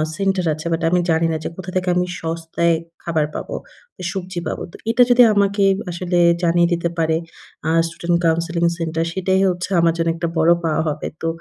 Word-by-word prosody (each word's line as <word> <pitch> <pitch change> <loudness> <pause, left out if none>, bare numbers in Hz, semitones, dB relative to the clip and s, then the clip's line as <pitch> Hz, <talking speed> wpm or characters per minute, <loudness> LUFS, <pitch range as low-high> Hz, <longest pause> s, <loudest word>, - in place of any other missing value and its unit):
Centre 195 -1 0
আছে 155 +1 -8
but 165 0 0
আমি 180 +1 +2
জানি 165 0 +2
না 160 - -1
যে, - - -3
কোথা 185 0 -7
থেকে 185 0 0
আমি 180 0 +2 0.2
সস্তায় 165 +1 0 0.3
খাবার 160 -3 0
পাবো, - - -5 0.6
সবজি 185 -2 -5
পাবো। - - -4
তো - - -13
এটা 235 +2 +5
যদি 245 0 +7
আমাকে 200 0 +2 0.3
আসলে 175 +1 -2 0.3
জানিয়ে 170 0 +3
দিতে 170 0 -1
পারে, 160 -1 +1 0.5
আ - - +2 0.2
স্টুডেন্ট 170 +1 -1
কাউন্সেলিং 170 +1 +1
সেন্টার, 165 -1 -1
সেটাই 190 +1 +1
হচ্ছে 180 +1 -3
আমার 165 0 +3
জন্য 165 0 0
একটা 170 0 -2
বড় 160 +1 +4
পাওয়া 160 -1 +1
হবে। 150 0 -3
তো 165 - -1
170 Hz, 190 wpm, -20 LUFS, 165-185 Hz, 0.6 s, যদি